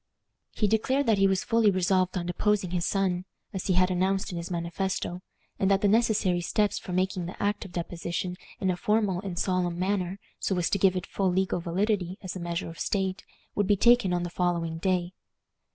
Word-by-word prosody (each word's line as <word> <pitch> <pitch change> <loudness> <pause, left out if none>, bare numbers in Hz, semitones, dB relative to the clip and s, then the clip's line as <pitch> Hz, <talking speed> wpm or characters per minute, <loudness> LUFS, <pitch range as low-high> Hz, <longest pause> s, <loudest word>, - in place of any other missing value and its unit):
He 210 - +1
declared 260 +7 +1
that 220 -4 +3
he 195 - +5
was 190 -1 +1
fully 230 -2 +3
resolved 185 -1 +1
on 175 - -2
deposing 195 +1 0
his 175 -2 0
son, 185 -2 0 0.3
as 190 - -3
he 190 - +3
had 185 +1 +3
announced 190 +3 0
in 175 - -4
his 170 - -6
manifesto, 175 +1 -2 0.4
and 190 - +2
that 195 0 +3
the 205 - +3
necessary 210 -5 +2
steps 205 +4 +1
for - - -8
making 185 -1 0
the 180 - -9
act 205 +1 -1
of 190 - -10
deposition 175 +1 -3 0.2
in 190 -2 +1
a 175 - -3
formal 210 -3 +1
and 190 -4 -5
solemn 180 -2 0
manner, 185 0 -1 0.2
so 190 - 0
as 175 - 0
to 200 - +2
give 190 0 +4
it 180 - -2
full 195 -2 0
legal 190 0 +1
validity 185 +1 -1
as 185 -1 -5
a - - -4
measure 170 +1 -3
of 165 - -10
state, 190 -2 -1 0.3
would 205 -2 0
be 205 0 +4
taken 235 -2 +5
on 175 0 0
the 175 - -4
following 170 -2 -1
day. 180 0 0
185 Hz, 210 wpm, -28 LUFS, 175-200 Hz, 0.4 s, he